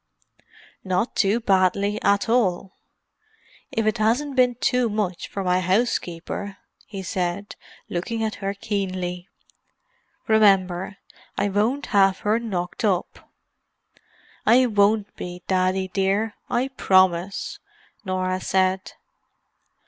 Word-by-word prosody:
"Not 185 +4 -1
too 205 +3 +2
badly 200 0 +1
at 200 +2 +2
all—if 225 - -4
it 215 +1 0
hasn't 255 +6 +1
been 250 -1 +3
too 250 0 +1
much 205 -4 -2
for 195 - -5
my 180 0 +2
housekeeper," 190 -1 -1 0.3
he 195 -3 -7
said, 185 +1 -3 0.3
looking 225 +6 -3
at 215 -1 -1
her 195 +1 -2
keenly. 185 -3 -3 1.0
"Remember, 195 -3 +3 0.4
I 205 - +1
won't 220 +8 0
have 195 -2 +4
her 215 +2 +1
knocked 180 -6 -4
up." 190 -5 -1 1.1
"I 245 +4 +5
won't 205 -2 +2
be, 180 0 -7
Daddy 185 0 +1
dear—I 210 +6 -1
promise," 185 -5 +1 0.4
Norah 185 -1 -2
said. 190 0 0
200 Hz, 105 wpm, -23 LUFS, 185-220 Hz, 1.1 s, I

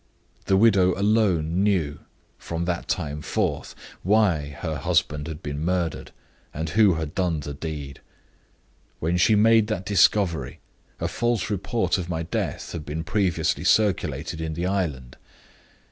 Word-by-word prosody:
The 95 - +3
widow 95 -4 +4
alone 95 -5 +2
knew, 90 -8 +1 0.4
from 85 0 -4
that 85 -1 -2
time 75 -4 -2
forth, - - -2 0.3
why 95 -7 +2
her 80 -3 -2
husband 80 -2 0
had 80 0 -7
been 75 +1 -4
murdered, 85 -2 -1 0.5
and 80 +2 -3
who 100 0 +4
had 80 -2 -4
done 85 -5 0
the 70 0 -6
deed. 70 -2 -6 1.0
When 85 +3 0
she 105 +5 +4
made 110 +1 +5
that 105 -4 -3
discovery, 95 -7 +2 0.4
a - - -1
false 120 -4 -1
report 105 +1 0
of 90 -1 -5
my 80 -1 -2
death 85 - -3
had 85 -3 -5
been 80 +2 -4
previously 95 -2 0
circulated 85 -6 +1
in 80 -1 -3
the 85 +2 -2
island. 75 -10 -2
85 Hz, 145 wpm, -24 LUFS, 80-100 Hz, 1.0 s, made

